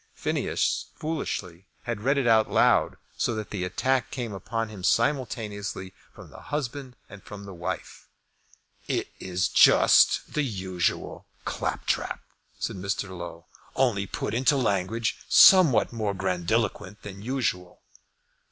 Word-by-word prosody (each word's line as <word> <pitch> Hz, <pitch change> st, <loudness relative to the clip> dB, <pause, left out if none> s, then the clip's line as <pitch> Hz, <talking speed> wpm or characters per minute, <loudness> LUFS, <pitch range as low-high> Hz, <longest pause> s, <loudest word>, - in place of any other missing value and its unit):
Phineas, -, -, -1 dB
foolishly, 100 Hz, -, -4 dB, 0.2 s
had 120 Hz, -3 st, -4 dB
read 140 Hz, +5 st, +2 dB
it 140 Hz, -, +1 dB
out 110 Hz, -2 st, +4 dB
loud, -, -, +3 dB, 0.2 s
so 120 Hz, -, 0 dB
that 110 Hz, -1 st, -6 dB
the 100 Hz, -3 st, -3 dB
attack 130 Hz, +8 st, 0 dB
came 120 Hz, -5 st, -5 dB
upon 110 Hz, +4 st, -3 dB
him 100 Hz, -4 st, -10 dB
simultaneously 105 Hz, -6 st, -1 dB, 0.2 s
from -, -, -14 dB
the -, -, -12 dB
husband 140 Hz, -3 st, -4 dB
and 95 Hz, 0 st, -12 dB
from 100 Hz, +1 st, -10 dB
the 100 Hz, -, -9 dB
wife. 85 Hz, -1 st, -6 dB, 0.8 s
"It -, -, -1 dB
is 90 Hz, -1 st, -1 dB
just -, -, +5 dB
the 150 Hz, -, +1 dB
usual 95 Hz, -, -2 dB, 0.2 s
claptrap," -, -, -2 dB, 0.4 s
said -, -, -4 dB
Mr. 95 Hz, 0 st, -3 dB
Low, 85 Hz, -1 st, -8 dB, 0.3 s
"only 110 Hz, -7 st, +1 dB
put -, -, -4 dB
into 130 Hz, +4 st, +3 dB
language 110 Hz, -1 st, 0 dB
somewhat 155 Hz, -, +7 dB
more 105 Hz, -3 st, -2 dB
grandiloquent 95 Hz, +2 st, -1 dB
than 100 Hz, -1 st, -9 dB
usual." 110 Hz, -7 st, -3 dB
105 Hz, 130 wpm, -26 LUFS, 95-125 Hz, 0.8 s, somewhat